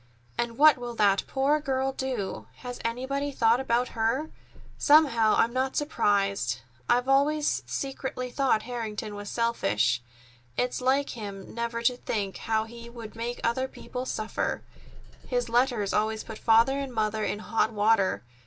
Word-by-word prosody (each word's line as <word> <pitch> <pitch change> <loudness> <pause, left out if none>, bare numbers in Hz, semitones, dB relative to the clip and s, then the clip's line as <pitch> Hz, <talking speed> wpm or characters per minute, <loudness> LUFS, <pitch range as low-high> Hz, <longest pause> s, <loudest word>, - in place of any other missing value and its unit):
And 235 -1 -2
what 300 -2 +7
will 240 -1 -5
that 200 -3 +3
poor 280 +3 +2
girl 270 -2 0
do? 260 -7 -4 0.2
Has 245 0 -5
anybody 260 +5 -2
thought 235 -2 +3
about 245 -1 +1
her? 230 +8 -1 0.5
Somehow, 270 -8 +5
I'm 235 +1 +3
not 260 +1 0
surprised. 195 - +1 0.3
I've 245 +1 +3
always 290 +2 +2
secretly 265 -2 -4
thought 255 -5 +2
Harrington 220 -3 -4
was 205 0 -6
selfish. 120 - +1 0.6
It's 250 +1 0
like 270 +2 +2
him 200 -4 -7
never 235 0 -3
to 245 +1 +2
think 200 -6 -3
how 220 -1 0
he 235 +1 -10
would 230 -2 -9
make 235 +2 -4
other 260 +3 +1
people 255 -1 -7
suffer. 215 -2 -2 0.6
His 245 -2 -1
letters 240 -4 +1
always 215 +1 0
put 220 - -9
Father 230 +5 +4
and 275 -2 -4
Mother 215 -2 -1
in - - -1
hot 220 +1 0
water. 205 - +2
235 Hz, 150 wpm, -27 LUFS, 215-260 Hz, 0.6 s, what